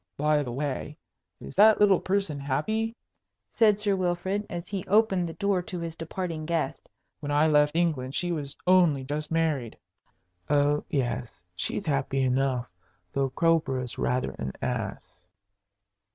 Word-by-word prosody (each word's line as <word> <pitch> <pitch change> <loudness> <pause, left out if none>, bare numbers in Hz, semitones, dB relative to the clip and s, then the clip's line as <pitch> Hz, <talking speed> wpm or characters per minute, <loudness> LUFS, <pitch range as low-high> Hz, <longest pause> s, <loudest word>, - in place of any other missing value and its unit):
"By 150 0 +2
the 125 -4 -4
way, 145 +3 -3 0.4
is - - -9
that 215 +2 +7
little 200 -3 +5
person 185 -7 -1
happy?" 215 - -1 0.6
said 210 -3 +4
Sir 205 -2 +2
Wilfrid, 185 +3 -1
as 175 0 -5
he 195 -3 -3
opened 195 -4 +3
the - - -6
door 200 -1 0
to 180 -1 -5
his 165 -1 -5
departing 165 -1 -4
guest. 165 -5 -2 0.3
"When 145 -1 -4
I 145 +2 +4
left 150 -1 +3
England 150 -6 0
she 175 -1 -1
was 145 -4 -4
only 175 -7 +4
just 150 +3 -4
married." 155 -8 0 0.7
"Oh 145 0 +3
yes, 125 - -2 0.2
she's - - -3
happy 135 -2 0
enough, 130 -1 +1 0.5
though 135 -1 +1
Crowborough's 135 -5 0
rather 125 +1 0
an 65 0 -4
ass." - - -5
155 Hz, 145 wpm, -27 LUFS, 140-185 Hz, 0.7 s, that